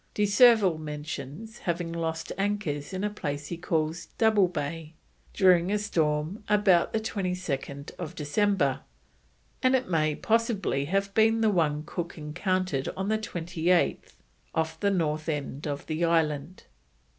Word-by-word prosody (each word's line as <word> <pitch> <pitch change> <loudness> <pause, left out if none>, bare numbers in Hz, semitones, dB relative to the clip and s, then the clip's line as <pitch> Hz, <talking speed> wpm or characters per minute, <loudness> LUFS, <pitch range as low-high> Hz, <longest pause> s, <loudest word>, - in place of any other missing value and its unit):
De 210 - +2
Surville 205 -5 +5
mentions 150 - -7
having 170 -1 -2
lost 165 -1 -3
anchors 195 -8 -2
in 190 +1 -3
a 210 - +1
place 145 -7 -4
he 170 - -3
calls 165 -1 -2
Double 215 -4 +4
Bay, 165 -1 -5 0.4
during 180 -1 +4
a 210 - +2
storm 160 -1 -1
"ABOUT 200 -4 +4
22nd 180 -7 -3
December," 155 -2 +1 0.8
and 255 0 +4
it 260 - 0
may 155 -3 +1
possibly 220 - 0
have 195 +4 -1
been 225 +1 +4
the 220 -1 +4
one 150 -5 +1
Cook 170 +2 -5
encountered 170 -1 -1
on 190 +2 -2
the 220 0 +1
28th 175 -3 0 0.4
off 160 0 -1
the 200 - +2
north 155 -4 0
end 145 0 -3
of 145 -1 -4
the 160 +2 -2
island. 160 0 0
170 Hz, 135 wpm, -27 LUFS, 155-200 Hz, 0.8 s, Surville